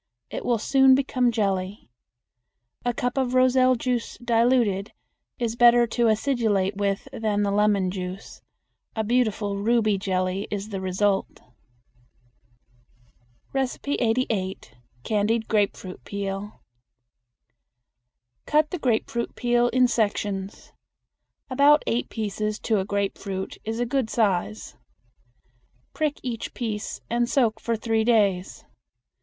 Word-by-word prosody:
It - - -5
will 240 -2 +1
soon 265 +3 +5
become 255 -2 +1
jelly. 195 - -2 0.9
A 245 - +1
cup 245 +2 -2
of 255 -1 0
roselle 255 0 +4
juice 245 0 -2
diluted 230 -4 +1 0.4
is 235 -2 -2
better 240 0 +6
to 235 0 +1
acidulate 215 -4 +1
with 200 +3 -1
than 215 -4 0
the 200 - 0
lemon 200 -2 +2
juice. 185 +1 -7 0.5
A 220 - 0
beautiful 215 -3 0
ruby 215 -1 +2
jelly 185 0 -1
is 205 0 -4
the 195 -2 -4
result. 195 +1 0 2.1
88. 245 - -1 0.3
Candied 220 - 0
Grapefruit 200 -3 -1
Peel. 200 +1 -5 1.8
Cut 305 0 +2
the 360 - -3
grapefruit 235 -2 -1
peel 240 0 +2
in 250 0 +3
sections. 205 -4 -2 0.7
About 285 +3 +4
eight 235 +2 -1
pieces 215 -1 -3
to 220 -3 +1
a 190 - -2
grapefruit 195 -1 -3
is 225 +1 -4
a 245 - +1
good 245 -1 -1
size. 180 - -1 1.2
Prick 305 -2 -1
each 235 -3 -5
piece 220 -3 -4
and 240 +1 0
soak 225 -5 +2
for 230 - -1
three 225 0 0
days. 205 -6 +1
220 Hz, 115 wpm, -25 LUFS, 200-245 Hz, 2.1 s, better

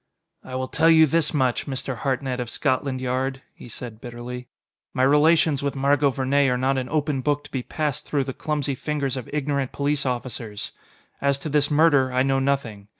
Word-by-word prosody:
"I 130 - -7
will 130 0 -2
tell 165 - +3
you 160 -1 +7
this 155 +1 +1
much, 130 -3 0
Mr. 130 -2 -3
Hartnett 130 0 -2
of 120 -2 -3
Scotland 130 -1 -1
Yard," 130 +1 -2
he 125 - -12
said 115 -1 -8
bitterly: 125 +1 -7 0.5
"My 130 - +2
relations 150 +1 +4
with 140 0 -2
Margot 140 +1 +3
Vernee 135 +1 +2
are 125 - +1
not 130 +1 +1
an 130 - -5
open 150 -3 0
book 145 +2 0
to - - -14
be 130 - -2
passed 150 +1 -3
through 145 -2 0
the 130 0 -5
clumsy 150 -2 -2
fingers 140 -1 -2
of 130 -3 -6
ignorant 140 -2 -1
police 145 0 0
officers. 120 -4 -4 0.5
As 140 0 +2
to 145 +3 -6
this 145 0 +2
murder, 145 -4 +4
I 130 +1 +2
know 135 0 +2
nothing. 135 -7 -1
135 Hz, 195 wpm, -24 LUFS, 130-145 Hz, 0.5 s, you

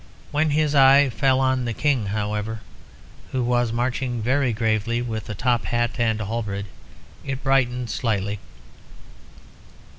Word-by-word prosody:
When 155 +1 +1
his 150 0 +1
eye 135 -1 +6
fell 135 +2 +2
on 130 -1 +1
the 115 -2 -3
King, 135 -8 +1
however, 105 +2 -3 0.7
who 130 -1 -1
was 120 -1 +1
marching 125 +1 -1
very 130 +3 +1
gravely 110 +1 0
with 110 -4 -4
a 105 - -4
top 120 +4 0
hat 120 0 -1
and 110 -2 +1
a 110 - -3
halberd, 100 -2 -3 0.6
it 135 0 -5
brightened 125 -3 +1
slightly. 100 -3 -1
120 Hz, 140 wpm, -23 LUFS, 110-130 Hz, 0.7 s, eye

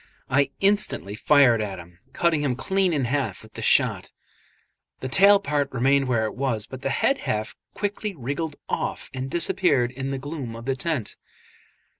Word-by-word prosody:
I 140 +1 +3
instantly 200 - +2
fired 120 -1 +4
at 100 -3 -4
him, 85 0 -13
cutting 160 0 +1
him 135 -4 0
clean 190 +7 0
in 145 -5 0
half 135 +2 -2
with - - -17
the - - -7
shot; - - +2 0.9
the 130 - -4
tail 200 +8 +6
part 145 -7 -1
remained 135 +2 +2
where 115 -3 +1
it 110 - -4
was, 125 -5 -2
but 130 +2 -10
the 135 - -2
head 275 - +1
half 110 - -3 0.2
quickly 205 0 -3
wriggled 145 +3 -4
off - - -3
and 130 0 -4
disappeared 150 -6 +1
in 135 +1 -5
the 135 - -2
gloom 135 -4 -6
of 115 +1 -9
the 135 0 0
tent. 140 -5 -3
135 Hz, 175 wpm, -24 LUFS, 125-160 Hz, 0.9 s, tail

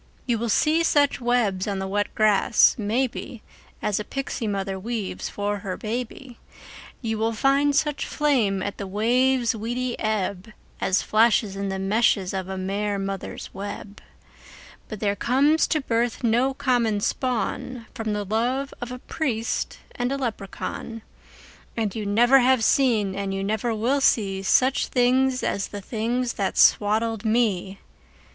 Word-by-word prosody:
You 235 -4 0
will 235 0 -2
see 310 +9 +3
such 285 -5 +2
webs 230 -6 +1
on 200 -1 -2
the 190 0 -3
wet 205 +1 -2
grass, 215 +1 +4
maybe, 235 +1 -2 0.4
As 210 -1 0
a - - -3
pixie 265 -1 -4
mother 195 -1 -2
weaves 220 -1 -4
for 205 0 -2
her 195 -2 -5
baby, 240 +2 -5 0.6
You 220 -1 -2
will 225 +1 0
find 275 +5 +2
such 295 0 0
flame 230 -11 +1
at 200 - -5
the 200 - -4
wave's 240 +4 +2
weedy 240 +3 -3
ebb 210 -1 -2 0.3
As 190 +1 +1
flashes 215 -2 +3
in 200 0 -3
the 190 - -3
meshes 195 -1 +1
of 190 -1 -4
a 190 - -4
mer 200 +2 -2
mother's 195 -1 -5
web, 200 +1 -7 0.9
But 215 -2 -7
there 205 -1 +1
comes 280 +9 +3
to 310 - 0
birth 235 -1 -1
no 245 +4 +2
common 240 -6 +1
spawn 250 +1 -2
From 225 -4 -3
the 205 0 -2
love 245 +7 -1
of 245 0 -5
a 250 - -5
priest 245 -4 -2 0.2
and 245 +1 -2
a 275 - -1
leprechaun, 225 -1 -5 0.7
And 215 -4 -1
you 215 -2 -3
never 240 +6 +5
have 255 -2 +3
seen 220 -7 +2
and 195 0 -3
you 195 - -2
never 220 +3 -1
will 250 +6 +1
see 195 -7 +2
Such 260 +7 +2
things 255 +1 +2
as 200 - -1
the 205 - -7
things 235 +4 -2
that 195 -2 -2
swaddled 220 +1 +3
me! 215 -4 0
225 Hz, 155 wpm, -24 LUFS, 200-250 Hz, 0.9 s, never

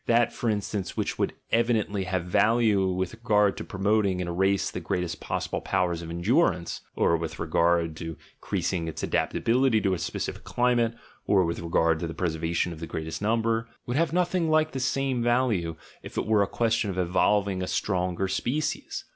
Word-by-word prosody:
That, 120 0 +3
for 120 - -1
instance, 105 -2 -2
which - - -2
would - - 0 0.2
evidently 110 -4 +1
have 90 -1 -2
value 105 +1 +3
with 95 0 -1
regard 105 -3 +2
to - - -4
promoting 100 -1 +1
in 90 - -2
a 85 - -3
race 95 +2 +1
the - - -4
greatest 90 -2 -2
possible - - -3
powers 85 -2 0
of 85 - -7
endurance 90 - +1
(or 85 - +3
with 80 -1 -5
regard 85 0 +1
to 80 -1 -6 0.2
increasing 90 -2 -2
its 80 - -5
adaptability 125 -1 +2
to 95 -2 +1
a 90 - -2
specific 80 - -4
climate, 120 -2 +1 0.3
or 95 -3 +4
with 85 0 -2
regard 80 -1 +1
to 85 - -3
the 80 - -7
preservation 85 0 -1
of 80 - -10
the 80 - -5
greatest 80 +1 -5
number) 115 +1 +1 0.2
would 120 - -3
have 160 0 +2
nothing 175 -1 +1
like 155 0 +3
the 135 - -4
same 130 -1 0
value, 115 -9 +1 0.3
if - - -10
it - - 0
were 110 -1 +3
a 100 - +2
question 115 -1 0
of 95 - -4
evolving 95 +2 +2
a 90 - -2
stronger 90 0 -1
species. 145 +10 -2
95 Hz, 185 wpm, -27 LUFS, 85-115 Hz, 0.3 s, or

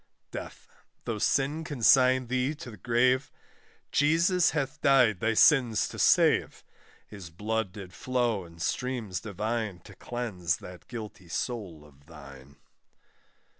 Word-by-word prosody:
DEATH. - - -8 0.4
Though 110 -2 -3
sin 145 +8 +1
consign 130 -3 +4
thee 130 +4 -1
to 130 -4 -9
the 105 - -12
gaave, 125 +5 +1 0.6
Jesus 165 +4 +3
hath 145 0 -3
died 125 -8 +4
thy 115 +2 0
sins 125 -4 +4
to - - -9
save; - - +3 0.4
His 100 -5 -10
blood 105 +3 -2
did 95 -2 -10
flow 120 -6 -1
in 85 -1 -15
streams 115 +1 -3
divine, 110 -1 -3
To - - -14
cleanse 95 -10 -3
that 90 -1 -12
guilty 105 -6 -8
soul 90 -6 -5
of 70 -1 -21
thine. 70 -3 -13
115 Hz, 130 wpm, -28 LUFS, 90-130 Hz, 0.6 s, consign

